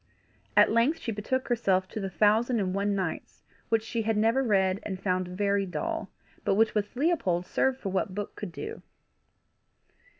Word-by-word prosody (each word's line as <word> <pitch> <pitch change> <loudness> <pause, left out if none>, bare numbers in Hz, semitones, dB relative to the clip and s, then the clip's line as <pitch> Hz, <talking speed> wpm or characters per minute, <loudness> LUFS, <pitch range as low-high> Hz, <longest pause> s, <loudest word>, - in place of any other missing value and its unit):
At - - +7
length 235 +8 +3
she 230 - -4
betook 225 +5 -2
herself 190 -6 +2
to - - -5
the 195 -2 -3
Thousand 220 +5 +3
and 185 -2 -1
One 200 +1 0
Nights, 185 -4 -4 0.3
which 225 -1 +2
she 230 +1 -2
had 220 0 0
never 225 +5 +3
read, 195 -5 +2
and 190 -3 -5
found 185 -1 0
very 200 +2 0
dull, 325 - -3 0.3
but - - +2
which 220 +2 +3
with 210 +1 -2
Leopold 245 - +1
served 265 +5 0
for 195 - -4
what 190 0 -1
book 205 0 -5
could 205 -4 -6
do. 435 - -7
210 Hz, 175 wpm, -28 LUFS, 190-235 Hz, 0.3 s, At